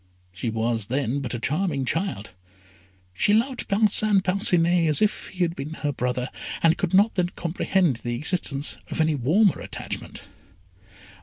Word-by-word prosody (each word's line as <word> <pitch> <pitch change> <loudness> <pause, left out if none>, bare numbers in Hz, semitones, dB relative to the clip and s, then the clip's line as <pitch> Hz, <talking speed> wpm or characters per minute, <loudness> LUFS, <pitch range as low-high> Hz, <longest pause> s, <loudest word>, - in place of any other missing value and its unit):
She 105 +6 -3
was 110 -1 -1
then 135 +1 -1
but 125 -4 -3
a - - -4
charming 150 0 -1
child. 165 - -2 0.8
She 205 - +2
loved 245 +3 0
Parcin 205 -1 +3
Parcinet 175 -3 +2
as 150 - +3
if 215 -1 0
he 185 -1 -2
had 170 0 -1
been 150 +2 -6
her 145 -2 -2
brother, 125 -1 -2 0.3
and 165 0 +5
could 185 -1 -1
not 205 +4 +4
then 180 -2 0
comprehend 170 -3 0
the 120 +1 -4
existence 145 0 -1
of - - -5
any 160 0 +3
warmer 160 - +2
attachment. - - -7
165 Hz, 155 wpm, -24 LUFS, 130-190 Hz, 0.8 s, and